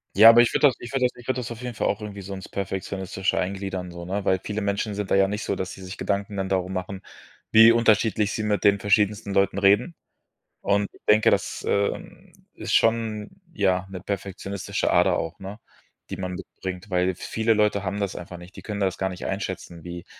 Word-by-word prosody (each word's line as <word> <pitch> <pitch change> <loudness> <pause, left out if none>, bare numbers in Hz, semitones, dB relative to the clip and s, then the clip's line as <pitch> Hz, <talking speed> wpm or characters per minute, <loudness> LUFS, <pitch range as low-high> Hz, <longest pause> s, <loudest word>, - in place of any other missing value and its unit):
Ja, 110 +4 +10
aber 115 +1 +8
ich 120 - +3
würde 145 - +5
das 130 - +1
ich 120 - -8
würde 135 -2 +1
das 125 - +1
ich 120 -1 -14
würde 130 -1 0
das 120 -1 -5
auf 115 0 -7
jeden 125 -2 -5
Fall - - 0
auch 105 - -1
irgendwie 100 -1 -7
so 100 +1 -7
ins 95 -1 -8
Perfektionistische 95 0 -3
eingliedern 95 -1 -3
so, 85 0 -8
ne, 95 +2 -3
weil 95 0 +2
viele 105 +1 -3
Menschen 100 +1 -1
sind 100 -2 -4
da - - +5
ja 95 0 +4
nicht 105 +2 -3
so, - - -1
dass 95 0 -4
sie 95 - -11
sich 95 +1 -8
Gedanken 100 0 -2
dann 95 -1 -2
darum 95 -1 -1
machen, 95 +1 -4 0.5
wie 115 +1 +9
unterschiedlich 110 -2 +3
sie - - -2
mit 105 -2 0
den 100 0 +4
verschiedensten 105 0 +1
Leuten 100 0 +2
reden. 105 - +3 0.7
Und 100 0 +1
ich - - -20
denke, 105 +1 +5
das - - -1
ähm, 100 0 -2 0.2
ist - - -4
schon, 110 -2 +1 0.2
ja, 95 -4 +1
'ne 95 -1 -7
perfektionistische 100 0 -3
Ader - - +4
auch, 80 0 -5
ne, 100 +3 -8 0.5
die - - -4
man 90 -1 -4
mitbringt, 95 0 -7
weil 90 0 +1
viele 110 +5 0
Leute 105 -1 +2
haben 100 +1 -3
das 100 -2 -2
einfach 90 0 -8
nicht. 90 +2 -13
Die - - -9
können 105 -2 -5
das 95 -2 0
gar 95 - 0
nicht 90 -1 -7
einschätzen, 95 -4 -5
wie 85 -1 -7
100 Hz, 225 wpm, -25 LUFS, 95-105 Hz, 0.7 s, Ja